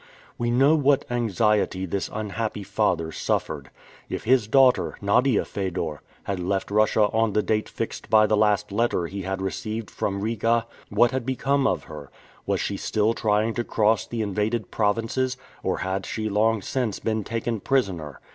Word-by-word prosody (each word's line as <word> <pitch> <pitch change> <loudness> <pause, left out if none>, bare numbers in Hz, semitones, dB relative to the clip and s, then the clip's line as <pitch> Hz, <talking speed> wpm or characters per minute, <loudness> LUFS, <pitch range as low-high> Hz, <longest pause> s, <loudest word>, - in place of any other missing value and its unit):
We 120 0 -1
know 135 +5 +4
what 145 -2 +3
anxiety 105 -4 +1
this 95 +2 -3
unhappy 110 0 -3
father 95 -5 0
suffered. 75 -3 -2 0.4
If - - -4
his 120 -2 +3
daughter, 130 +1 +4
Nadia 115 +4 +2
Fedor, 90 -6 -3 0.2
had 100 -2 -3
left 95 +2 -2
Russia 110 +1 +3
on 110 -1 +2
the 105 - +2
date 110 -1 0
fixed - - -5
by 110 -1 +6
the 110 - +2
last 105 -1 +2
letter 105 -4 +1
he 100 +4 -5
had 95 0 -3
received 110 +2 -4
from 100 0 -2
Riga, 115 +1 +1 0.2
what 120 - +4
had 130 -1 -2
become 135 +2 +1
of - - 0
her? 75 -3 -10 0.4
Was - - +1
she - - -2
still 110 +1 +1
trying 110 0 +1
to 120 - -1
cross 110 -1 +1
the 115 -2 -2
invaded 105 +2 -1
provinces, 115 +5 0 0.2
or - - -1
had 95 +1 -3
she 110 -1 -3
long 110 0 +2
since 125 -3 -1
been 110 -1 -1
taken 115 +1 -2
prisoner? 95 - -1
110 Hz, 165 wpm, -25 LUFS, 100-115 Hz, 0.4 s, by